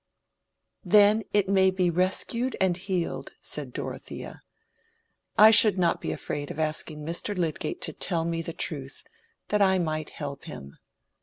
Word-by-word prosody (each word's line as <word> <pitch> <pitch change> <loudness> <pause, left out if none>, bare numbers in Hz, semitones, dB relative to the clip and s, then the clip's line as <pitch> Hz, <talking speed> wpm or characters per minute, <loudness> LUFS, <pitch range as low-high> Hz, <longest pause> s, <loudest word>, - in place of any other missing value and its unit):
"Then 205 +3 +5
it 205 -2 +2
may 190 -1 +4
be 185 -2 +1
rescued 190 +8 0
and 190 -2 +2
healed," 185 -1 -3
said - - -5
Dorothea - - -7 1.0
"I 215 +1 +9
should 215 -3 +6
not 175 -2 +1
be - - -3
afraid 145 -1 -4
of - - -7
asking 155 -1 -2
Mr. 170 +5 -3
Lydgate 165 -4 -2
to 160 - -1
tell 165 0 -1
me 165 0 -2
the 165 - -5
truth, 140 -4 -3 0.5
that 210 0 +1
I 190 -1 +4
might 155 -3 -2
help 140 -2 -7
him. 70 0 -9
175 Hz, 150 wpm, -26 LUFS, 155-195 Hz, 1.0 s, I